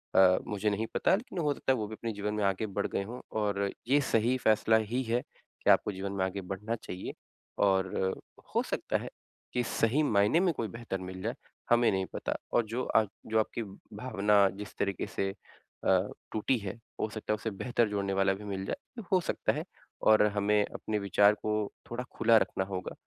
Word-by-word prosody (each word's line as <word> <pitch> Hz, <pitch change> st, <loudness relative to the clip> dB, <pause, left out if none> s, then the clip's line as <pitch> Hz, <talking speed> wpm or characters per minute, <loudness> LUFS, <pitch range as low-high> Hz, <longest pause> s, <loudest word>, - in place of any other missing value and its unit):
अ, 95 Hz, -1 st, +7 dB
मुझे 105 Hz, +1 st, 0 dB
नहीं 105 Hz, +2 st, -1 dB
पता -, -, +4 dB
लेकिन 200 Hz, -3 st, -5 dB
हो 150 Hz, -3 st, +2 dB
सकता 135 Hz, -, 0 dB
है -, -, 0 dB
वो 105 Hz, -2 st, -2 dB
भी 110 Hz, -, -7 dB
अपने 115 Hz, 0 st, -4 dB
जीवन 105 Hz, +1 st, -2 dB
में 105 Hz, -1 st, -1 dB
आगे 100 Hz, +2 st, +1 dB
बढ़ 100 Hz, -, +1 dB
गए -, -, -2 dB
हों 120 Hz, +5 st, -7 dB, 0.2 s
और 100 Hz, -1 st, 0 dB, 0.2 s
ये 140 Hz, +3 st, +5 dB
सही 120 Hz, -1 st, +2 dB
फैसला 110 Hz, -1 st, +4 dB
ही 125 Hz, +2 st, +1 dB
है 120 Hz, +1 st, 0 dB, 0.4 s
कि -, -, +3 dB
आपको -, -, +5 dB
जीवन 95 Hz, 0 st, -4 dB
में 95 Hz, -1 st, 0 dB
आगे 95 Hz, +1 st, -3 dB
बढ़ना 100 Hz, +5 st, -3 dB
चाहिए। 95 Hz, -5 st, -6 dB, 0.5 s
और, 95 Hz, -1 st, +1 dB, 0.3 s
हो -, -, +4 dB
सकता -, -, -1 dB
है -, -, -6 dB, 0.4 s
कि 125 Hz, -, +1 dB
सही 120 Hz, +5 st, +2 dB
मायने 105 Hz, +3 st, +4 dB
में 180 Hz, -2 st, +3 dB
कोई 115 Hz, -6 st, -2 dB
बेहतर 115 Hz, -3 st, -5 dB
मिल 95 Hz, 0 st, -7 dB
जाए 115 Hz, +5 st, -2 dB, 0.3 s
हमें 120 Hz, 0 st, +5 dB
नहीं 95 Hz, -1 st, 0 dB
पता। -, -, -2 dB, 0.2 s
और 120 Hz, -, +3 dB
जो 115 Hz, +4 st, -2 dB
अ, 110 Hz, -, +3 dB, 0.2 s
जो 110 Hz, 0 st, +2 dB
आपकी 110 Hz, +1 st, -1 dB, 0.3 s
भावना 105 Hz, -4 st, +3 dB
जिस 105 Hz, -1 st, -8 dB
तरीक़े 100 Hz, -1 st, -1 dB
से 95 Hz, -, -1 dB
अ, 100 Hz, -, -2 dB, 0.2 s
टूटी 115 Hz, +4 st, +1 dB
है 100 Hz, -3 st, -5 dB, 0.2 s
हो 110 Hz, -, +1 dB
सकता 105 Hz, 0 st, -2 dB
है -, -, +2 dB
उसे 110 Hz, +2 st, -3 dB
बेहतर 120 Hz, +2 st, 0 dB
जोड़ने 100 Hz, -1 st, -1 dB
वाला 95 Hz, 0 st, +3 dB
भी 100 Hz, +2 st, -8 dB
मिल 95 Hz, -2 st, -4 dB
जाए। 235 Hz, -, -6 dB
हो 185 Hz, -, +5 dB
सकता -, -, 0 dB
है -, -, -3 dB, 0.4 s
और 110 Hz, -1 st, +6 dB, 0.2 s
हमें 105 Hz, +1 st, +3 dB
अपने 105 Hz, -1 st, -3 dB
विचार 100 Hz, +1 st, +5 dB
को 110 Hz, -, -3 dB, 0.4 s
थोड़ा 120 Hz, +1 st, -3 dB
खुला 115 Hz, 0 st, +5 dB
रखना 95 Hz, -, +1 dB
होगा। 95 Hz, -1 st, -4 dB
105 Hz, 205 wpm, -30 LUFS, 100-115 Hz, 0.5 s, अ